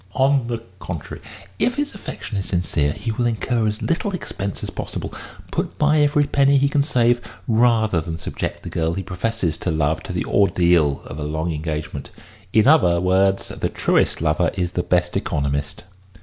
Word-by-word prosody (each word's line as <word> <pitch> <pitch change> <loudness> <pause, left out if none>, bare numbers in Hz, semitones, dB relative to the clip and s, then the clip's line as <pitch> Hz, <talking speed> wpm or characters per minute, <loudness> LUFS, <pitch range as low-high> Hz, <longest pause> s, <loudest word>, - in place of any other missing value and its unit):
On 135 -2 +3
the 115 -1 -3 0.2
contrary, 85 -4 -6 0.4
if 245 - +2
his 290 0 -2
affection 195 - -7
is 95 -1 -2
sincere, 85 -5 0
he 105 +8 -4
will 120 +2 0
incur 115 0 0
as 105 0 -2
little 180 +4 -1
expense 100 - -5
as - - -4
possible, - - -5 0.4
put - - -2
by 150 0 +3
every 145 0 +4
penny 140 0 +3
he 140 +1 +3
can 145 0 +2
save, 120 -4 +2 0.3
rather 110 -5 +3
than 80 0 -5
subject - - -4
the - - -6
girl 80 0 -1
he 95 - -3
professes 90 -2 -2
to - - -2
love 80 0 +1
to 95 - -7
the 90 - -2
ordeal 85 -7 +3
of 70 - -7
a - - -3
long 80 +3 -2
engagement. 75 -2 -4 0.4
In 110 +2 +4
other 90 - +5
words, 95 +2 +2
the - - -2
truest - - +1
lover 80 +2 +2
is 90 -2 -1
the 90 - -1
best 90 0 +1
economist." 70 +2 -2
95 Hz, 180 wpm, -21 LUFS, 85-120 Hz, 0.4 s, other